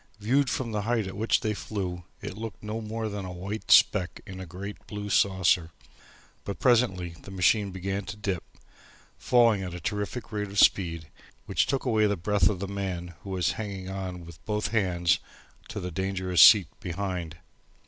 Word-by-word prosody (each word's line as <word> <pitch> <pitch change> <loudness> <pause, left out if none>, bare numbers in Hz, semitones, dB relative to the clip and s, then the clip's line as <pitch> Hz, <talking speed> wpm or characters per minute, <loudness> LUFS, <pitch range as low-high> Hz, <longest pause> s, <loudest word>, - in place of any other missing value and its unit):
Viewed 130 +6 +2
from 120 -3 -2
the 105 -1 -1
height 115 0 0
at 95 - -6
which 110 +3 +1
they 110 - 0
flew 95 -4 -4 0.2
it - - -5
looked 110 0 -7
no 110 +2 -4
more 110 +1 -3
than 100 -2 -4
a 90 - -6
white 95 +5 -6
speck 90 -4 +5
in 95 -1 -8
a 95 - -7
great 95 +4 -8
blue 105 -1 -5
saucer, 95 -4 +3 0.7
but 100 - -5
presently 115 -8 +2
the - - -12
machine 100 +2 +2
began 95 +2 -3
to 105 0 -7
dip, 95 -4 -2 0.8
falling 115 -5 +4
at 90 -2 -5
a - - -6
terrific 105 +6 -4
rate 105 -1 -2
of 100 - -8
speed, 85 -6 +3 0.4
which - - +1
took 135 0 -1
away 110 -4 +3
the 100 -1 0
breath 105 +5 +2
of 105 - -2
the 100 - -3
man 95 -3 -4
who 100 - -9
was 90 -4 +1
hanging 95 -3 -5
on 90 -3 -5
with 85 -1 -13
both 105 -1 -1
hands 90 -5 +2 0.5
to - - -5
the 90 0 -5
dangerous 95 -1 +1
seat 105 -5 +9
behind. 90 -3 -4
100 Hz, 185 wpm, -27 LUFS, 90-105 Hz, 0.8 s, seat